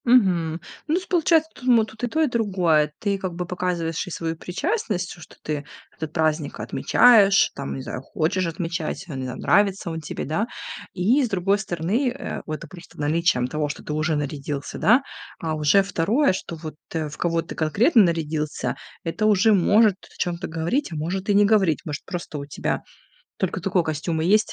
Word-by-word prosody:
Мгм. 180 -10 +3 0.3
Ну, 315 - +2
то - - +2
есть - - -11
получается, 325 -2 +3
тут 250 - -12
мо 235 -3 +5
тут 220 +2 -13
и - - +2
то, 315 +7 0
и - - +3
другое. 185 - +2
Ты 200 -2 -1
как 185 -2 -3
бы 180 +1 -3
показываешь 175 -1 -2
и - - -5
свою 165 -1 -3
причастность, 180 - -2
что 160 - -13
ты 150 -2 -3 0.3
этот 160 -2 -5
праздник 155 -2 0
отмечаешь, 205 -5 +5
там, 140 -1 -4
не 135 - -5
знаю, 130 - -5
хочешь 165 +6 -1
отмечать, 165 +1 -3
ам, 140 - -5
не 130 - -3
знаю, 125 0 -6
нравится 195 -2 +2
он 160 0 -4
тебе, 150 - -5
да. 180 - -1 0.5
И 225 +10 +3
с 245 - -1
другой 195 +1 +1
стороны, 195 - 0
э, 260 +3 -5
это 155 +1 -5
просто 175 +2 -14
наличием 150 -4 +2
того, 150 +2 -2
что 145 - -6
ты 150 - -4
уже 155 +1 0
нарядился, 145 -1 -4
да, 245 +6 +5 0.4
а 160 -1 -2
уже 155 +6 +4
второе, 200 - +2
что 180 -2 -5
вот, 155 -2 -8 0.2
э, 160 -2 -1
в 150 - -9
кого 165 -1 0
ты - - -8
конкретно 215 - +4
нарядился- 155 -3 -1 0.3
это 195 +6 0
уже 215 +1 +5
может 205 +2 +5
о - - -17
чём-то 175 -1 -2
говорить, 170 - -1
а - - -5
может 185 +6 -3
и 205 - +4
не 205 0 +6
говорить. 200 -7 +3
Может, 150 -3 -5
просто 175 -4 -5
у 140 - -6
тебя 145 - -2 0.6
только 185 0 -2
такой 185 0 +1
костюм 160 +1 -2
и - - 0
есть, 215 +2 +3
175 Hz, 200 wpm, -23 LUFS, 155-205 Hz, 0.6 s, не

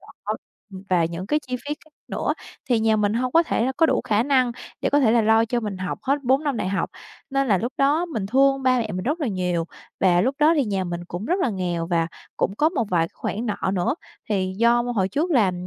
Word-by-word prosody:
trọ, - - -7 0.4
ừm, 190 0 -8
và 175 -3 +3
những 170 +3 -4
cái 300 - +2
chi 250 0 -2
phí 290 +4 -5
khác - - -21 0.2
nữa - - -1 0.4
thì 240 -3 +3
nhà 220 -1 +3
mình 210 0 +1
hông 250 +1 -1
có 330 - +6
thể 240 -8 0
là 265 - 0
có 325 - +5
đủ - - +2
khả 215 +1 +2
năng 255 -3 +2 0.3
để - - 0
có 290 - +4
thể 235 -5 +4
là 235 -2 +4
lo 220 +1 +4
cho 240 +1 -1
mình 205 -3 -4
học 185 -1 -3
hết 280 +2 0
4 265 +4 +2
năm 285 -5 0
đại 185 - -1
học. 195 - -1 0.4
Nên 275 0 +1
là 195 - +4
lúc 240 +7 -3
đó 290 +5 +3
mình 220 - -3
thương 270 +3 +3
ba 255 -1 +3
mẹ 220 -3 -2
mình 185 - -3
rất 305 +6 -1
là 275 - 0
nhiều 180 -3 -1 0.4
và 180 -2 +4
lúc 260 +6 +1
đó 305 +2 +5
thì 285 - +3
nhà 195 -4 -1
mình 175 0 -4
cũng 180 +5 -5
rất 360 +9 0
là 260 - +1
nghèo 175 -4 -2
và 165 -1 +1 0.3
cũng 195 - 0
có 310 - +4
một 280 -10 -1
vài 175 -2 +3
cái - - -37
khoản 230 +4 -3
nợ 200 -2 -1
nữa, 180 +8 +1 0.3
thì 190 -3 0
do 235 +1 +4
hồi 230 -6 0
trước 300 - -1
là 220 - +3
225 Hz, 265 wpm, -23 LUFS, 190-270 Hz, 0.4 s, có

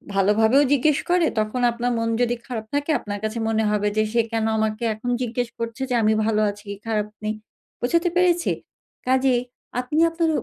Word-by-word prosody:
ভালোভাবেও 220 +7 +4
জিজ্ঞেস 285 +2 +3
করে 350 -1 +4
তখন 215 +4 -1
আপনার 240 +1 -1
মন 230 0 0
যদি 240 0 +2
খারাপ 230 -4 -5
থাকে 290 +2 0
আপনার 205 -1 -5
কাছে 215 +2 -2
মনে 220 0 +1
হবে 210 0 +1
যে 215 - +4
সে 235 - +4
কেন 225 -1 0
আমাকে 220 +1 -1
এখন 230 +3 -5
জিজ্ঞেস 245 0 -2
করছে 230 +2 -4
যে 250 - +1
আমি 215 0 +4
ভালো 215 -1 +2
আছি 205 0 -8
কি - - -4
খারাপ 210 -2 0 0.2
নেই? 215 +1 -1 0.5
বোঝাতে 335 +8 +2
পেরেছি? 350 -1 +3 0.6
কাজেই 260 -1 +3 0.4
আপনি 275 +5 -1
আপনার 330 0 0
235 Hz, 185 wpm, -23 LUFS, 215-270 Hz, 0.6 s, ভালোভাবেও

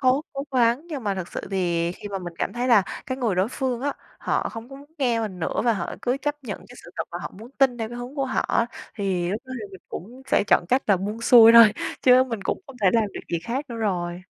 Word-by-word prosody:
cố 260 +2 +3
cố 275 0 -4
gắng 245 +4 +2
nhưng 290 -8 -6
mà 200 -1 0
thực 185 -2 -5
sự - - -5
thì 175 -3 0
khi 205 - -9
mà 195 -1 -3
mình 175 -2 -7
cảm - - -1
thấy 245 +2 -2
là 225 -5 +6 0.2
cái 260 0 -3
người 230 -7 0
đối 185 +3 +1
phương 255 -1 -2
á, 285 +2 -1 0.3
họ - - -1
không 225 +1 -8
có 270 - -10
muốn 285 +2 -15
nghe 240 -5 +1
mình 205 -5 -4
nữa 165 - -1
và 235 - +4
họ 205 - -3
cứ 250 +1 +1
chấp 295 -1 -3
nhận 210 -5 -5
cái 245 - -13
sự - - -12
thật - - -2
mà 175 - -5
họ - - -6
muốn 225 +3 -11
tin 260 -3 +3
theo 225 -1 -3
cái 240 +1 -7
hướng 245 +3 -7
của 275 -2 0
họ - - 0
á, 230 - +1 0.3
thì 190 -5 -1
lúc 215 +5 -3
đó 260 - -9
thì 210 - -6
mình 190 - -11
cũng 245 +8 -8
sẽ 270 - +2
chọn - - +4
cách 260 +5 +3
là 200 - +4
buông 205 +5 -4
xuôi 230 -1 +8
thôi 230 -2 +9 0.3
chứ 255 0 +6
mình 230 -6 -5
cũng - - -2
không 270 -3 -12
thể - - +4
làm 230 -2 +3
được - - -6
gì 170 - +1
khác 255 +7 -2
nữa 235 - -6
rồi. 180 -5 -2
230 Hz, 285 wpm, -24 LUFS, 195-255 Hz, 0.3 s, thôi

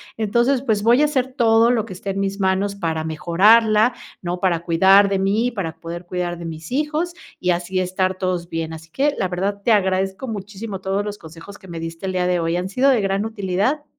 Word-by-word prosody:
entonces, 235 +5 +1
pues, 220 -6 0
voy 235 +5 +4
a - - +5
hacer 265 -3 -1
todo 230 0 +4
lo 225 -3 0
que - - -11
esté 190 +2 -5
en 195 +1 -2
mis 195 +1 -2
manos 195 +1 0
para 165 -5 -2
mejorarla, 210 +8 +4 0.3
¿no?, 180 0 -3
para 175 -3 +1
cuidar 190 +4 +5
de 195 -1 0
mí, 215 +6 +1
para 180 -8 -4
poder 170 +2 -7
cuidar 175 -1 -3
de 170 - -8
mis 160 +2 -8
hijos 305 +5 -1 0.3
y 180 - 0
así 180 +2 0
estar 185 +1 -1
todos 180 -2 -2
bien, 165 -1 -4
así 160 0 -10
que 285 - +1
la 190 - +1
verdad 195 +3 -2
te 225 +1 +3
agradezco 190 +2 0
muchísimo 205 -1 -6
todos 195 +2 -1
los 205 0 -5
consejos 165 +5 -12
que 190 - -15
me 165 -2 -6
diste 165 +3 -6
el 190 - -2
día 180 -1 0
de 180 -1 +1
hoy, 165 0 -1
han 180 +2 -2
sido 255 +7 +2
de 245 -5 +2
gran 195 +1 0
utilidad. 220 +7 -1
195 Hz, 225 wpm, -21 LUFS, 180-220 Hz, 0.3 s, a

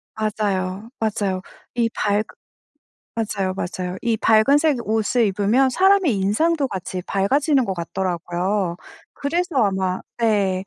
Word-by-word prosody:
맞아요, 205 -1 -2
맞아요. 200 -4 -1 0.3
이 235 -1 +2
밝으 210 -1 0 0.9
맞아요, 200 -4 -1
맞아요. 180 0 -4
이 230 -2 +1
밝은 225 +7 +4
색 305 -4 +2
옷을 220 +2 +1
입으면 210 +7 +2
사람의 380 - +3
인상도 275 - +1
같이 185 -2 -5
밝아지는 270 +7 +2
것 190 - -2
같더라고요. 180 +1 -2 0.4
그래서 335 +3 -2
아마 190 -2 0 0.2
네, 200 -5 +1
210 Hz, 270 characters per minute, -22 LUFS, 190-250 Hz, 0.9 s, 밝은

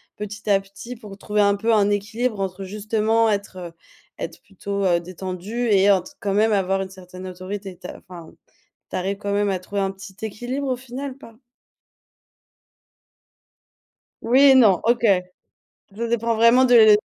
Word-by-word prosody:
petit 210 +1 -7
à 195 -1 +4
petit 200 +5 -10
pour 210 -4 -11
trouver 210 +1 0
un 200 0 +4
peu 225 +3 +1
un 205 -2 +3
équilibre 215 +2 -1
entre 195 0 -3
justement 215 +3 +1
être 185 -4 -4 0.4
être 165 - -7
plutôt, 200 0 -4
heu, 175 -2 +3
détendu 185 +6 -5
et 200 -1 +5
ent 190 -3 +3 0.2
quand 200 -1 -1
même 215 +2 +3
avoir 195 -1 +1
une 190 - -5
certaine 185 0 -11
autorité. 185 +1 -7
Ta - - -9
enfin 175 -3 -12 0.6
tu - - -6
arrives 195 +2 -2
quand 200 0 -4
même 205 0 +1
à 190 - 0
trouver 200 +2 -4
un 195 0 0
petit 195 0 -12
équilibre 245 +6 -4
au 255 - 0
final 260 +2 -7
ou - - -22
pas? 230 -5 -14 2.9
Oui 255 +4 +3
et 275 -2 +8
non, 210 -8 +5
OK. 235 +1 +2 0.9
Ça 235 +2 -3
dépend 230 0 0
vraiment 230 +3 +5
de, 245 -1 +5
heu, 220 -2 +8
205 Hz, 170 wpm, -22 LUFS, 190-230 Hz, 2.9 s, et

